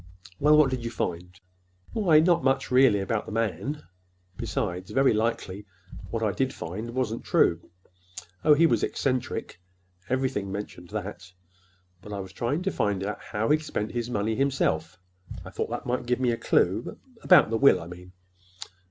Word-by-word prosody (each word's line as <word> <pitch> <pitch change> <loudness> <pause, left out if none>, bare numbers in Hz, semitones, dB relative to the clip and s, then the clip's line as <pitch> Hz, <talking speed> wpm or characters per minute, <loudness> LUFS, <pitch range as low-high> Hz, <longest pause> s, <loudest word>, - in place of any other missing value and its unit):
"Well, 150 +1 +5
what 150 -3 +5
did 125 -2 -3
you 115 - -3
find?" 90 -4 -4 0.5
"Why, 175 -8 +4
not 170 -2 +3
much, 135 0 +1
really, 125 -6 +5
about 105 +2 -2
the - - -6
man. 115 - -2 0.5
Besides, 90 +1 -3
very 135 -2 +3
likely 105 -3 -2 0.4
what - - -2
I - - +2
did - - -1
find 110 +8 -6
wasn't 120 -3 -2
true. 85 0 +2 0.7
Oh, 150 - +6
he 165 +3 +5
was - - +2
eccentric. 130 -8 -2 0.5
Everything 130 -7 -1
mentioned 95 -3 -7
that. 95 -3 -6 0.7
But 105 +2 -9
I 100 - -4
was 95 -1 -8
trying 140 - -2
to 195 - 0
find 100 - -1
out 105 - -4
how 110 +2 -2
he'd 155 +1 +3
spent 110 -8 -3
his 120 0 -3
money 110 -1 -1
himself. 110 - 0 0.5
I - - -9
thought - - -3
that - - -5
might 125 0 -2
give 125 +1 +1
me 125 -2 +2
a - - 0
clue—about 125 - +2
the 115 - +1
will, 140 +4 +5
I 85 - -8
mean." 90 +1 -11
115 Hz, 170 wpm, -26 LUFS, 95-135 Hz, 0.7 s, Oh